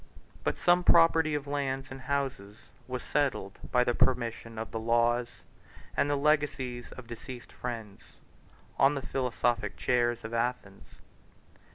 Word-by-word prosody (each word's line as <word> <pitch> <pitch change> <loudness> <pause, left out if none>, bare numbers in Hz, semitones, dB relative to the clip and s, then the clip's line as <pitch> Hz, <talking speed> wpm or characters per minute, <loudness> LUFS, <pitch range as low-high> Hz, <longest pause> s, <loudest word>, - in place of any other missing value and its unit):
But - - 0
some 175 0 +4
property 165 -3 +5
of 145 -1 -3
lands 135 -2 -2
and 135 0 -8
houses 130 -7 -3 0.2
was 125 -1 -4
settled 130 -9 -1
by 125 -1 +4
the 120 - +1
permission 115 -3 0
of 110 0 -5
the 115 - -3
laws, 120 +1 +1 0.5
and 145 - +2
the 145 - +2
legacies 140 -4 0
of 130 - -10
deceased 120 +1 -9
friends, 115 -5 -6 0.8
on 140 +2 +5
the 140 - -4
philosophic 120 -4 0
chairs 120 -1 +1
of 110 +1 -6
Athens. 115 -4 -3
125 Hz, 140 wpm, -30 LUFS, 115-140 Hz, 0.8 s, property